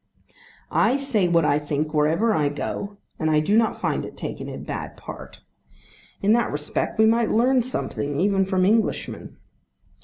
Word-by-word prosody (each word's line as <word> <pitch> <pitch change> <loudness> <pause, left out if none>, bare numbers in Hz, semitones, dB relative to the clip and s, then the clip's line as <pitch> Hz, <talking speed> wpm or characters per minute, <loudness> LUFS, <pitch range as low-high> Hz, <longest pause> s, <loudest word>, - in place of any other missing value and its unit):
I 240 +4 +3
say 255 -9 +1
what 170 -2 +3
I 145 0 +3
think 150 +1 -3
wherever 160 +9 +2
I 150 -5 +1
go, 200 +7 -5 0.2
and 155 -3 0
I 155 -1 +4
do 175 +8 +1
not 225 -1 +2
find - - -1
it - - -9
taken - - -6
in - - -7
bad - - -6
part. - - -10 0.8
In 205 +2 +4
that 235 0 +2
respect 150 +1 -2
we 220 - +5
might 230 +1 +3
learn 250 +3 +3
something 145 - -3
even 195 0 +2
from 185 -1 +1
Englishmen. 220 +3 -1
195 Hz, 165 wpm, -23 LUFS, 150-225 Hz, 0.8 s, we